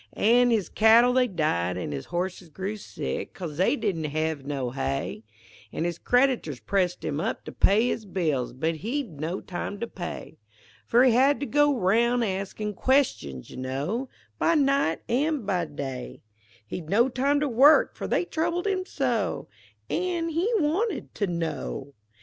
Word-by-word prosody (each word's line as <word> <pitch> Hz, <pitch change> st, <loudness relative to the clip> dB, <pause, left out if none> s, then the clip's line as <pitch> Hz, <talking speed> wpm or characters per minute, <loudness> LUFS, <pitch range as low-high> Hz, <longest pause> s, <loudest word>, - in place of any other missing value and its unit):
An' 245 Hz, +3 st, +4 dB
his 220 Hz, -5 st, +1 dB
cattle 230 Hz, +3 st, +5 dB
they 255 Hz, -1 st, +3 dB
died, 90 Hz, -, 0 dB
an' 90 Hz, -, -4 dB
his 70 Hz, -2 st, -5 dB
horses 180 Hz, 0 st, -4 dB
grew 190 Hz, +7 st, -4 dB
sick, 210 Hz, -, -5 dB
'Cause 165 Hz, -6 st, -6 dB
they 185 Hz, -, +3 dB
didn't 165 Hz, -, -2 dB
hev 155 Hz, -1 st, -2 dB
no 135 Hz, -4 st, -2 dB
hay; 135 Hz, -3 st, -3 dB, 0.5 s
An' -, -, -3 dB
his 170 Hz, -1 st, -2 dB
creditors 245 Hz, -, +1 dB
pressed 180 Hz, -, -1 dB
him 145 Hz, -, -2 dB
to -, -, -3 dB
pay 220 Hz, +5 st, +3 dB
up -, -, +2 dB
his 220 Hz, -, -7 dB
bills, 155 Hz, -10 st, -1 dB
But 160 Hz, +6 st, -2 dB
he'd 225 Hz, -, -4 dB
no 170 Hz, +5 st, -2 dB
time 185 Hz, +3 st, -5 dB
to 235 Hz, -, -2 dB
pay, 175 Hz, -6 st, -7 dB, 0.5 s
For 240 Hz, +2 st, +5 dB
he 260 Hz, -, +6 dB
had 270 Hz, +5 st, +4 dB
to -, -, 0 dB
go 290 Hz, -1 st, +3 dB
roun' 235 Hz, +5 st, +2 dB
askin' 200 Hz, +1 st, -3 dB
questions, 195 Hz, -, 0 dB
you -, -, -9 dB
know, 145 Hz, -, -3 dB, 0.3 s
By 335 Hz, -, +3 dB
night 275 Hz, -, +2 dB
an' 280 Hz, +1 st, 0 dB
by 180 Hz, -4 st, 0 dB
day; 135 Hz, -4 st, -6 dB, 0.4 s
He'd 160 Hz, +7 st, -7 dB
no 230 Hz, +7 st, +4 dB
time 275 Hz, +3 st, +1 dB
to 295 Hz, -, 0 dB
work, 275 Hz, +5 st, +5 dB
for -, -, -5 dB
they -, -, +1 dB
troubled 340 Hz, +2 st, -1 dB
him 380 Hz, -2 st, -1 dB
so, 235 Hz, -, -1 dB, 0.4 s
An' 350 Hz, -2 st, -1 dB
he 340 Hz, +8 st, 0 dB
wanted 370 Hz, +7 st, -1 dB
to 205 Hz, -, -1 dB
know. 160 Hz, -5 st, -4 dB
200 Hz, 165 wpm, -26 LUFS, 160-265 Hz, 0.5 s, he